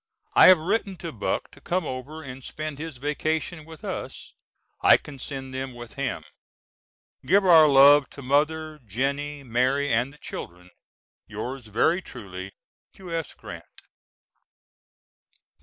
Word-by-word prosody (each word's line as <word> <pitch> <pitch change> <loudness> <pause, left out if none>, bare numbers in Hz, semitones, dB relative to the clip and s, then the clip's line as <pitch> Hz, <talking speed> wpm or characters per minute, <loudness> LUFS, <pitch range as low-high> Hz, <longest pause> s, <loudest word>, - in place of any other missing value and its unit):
I - - +8
have 185 - +9
written 195 +3 -1
to 165 -1 -6
Buck 105 - -3
to - - -18
come 180 -1 -1
over 140 +5 -6
and 130 -1 -9
spend 155 0 -6
his 160 -3 -6
vacation 155 +4 -2
with 160 -1 -13
us. - - -6 0.5
I - - +7
can 140 -3 -12
send 135 0 -6
them 130 -1 -5
with 120 -1 -10
him. - - -3 1.0
Give 195 +2 +3
our 165 -4 +8
love 140 0 +7
to 140 - -8
Mother, 155 +3 0
Jennie, 140 +6 -2
Mary 130 +3 +1
and 120 +4 +1
the 150 - -17
children. 90 -8 -9 0.6
Yours 120 +3 -6
very 140 - +2
truly, 95 - -9 0.4
U.S. 165 -4 -5
GRANT. 85 -6 -9
140 Hz, 135 wpm, -25 LUFS, 125-155 Hz, 1.0 s, have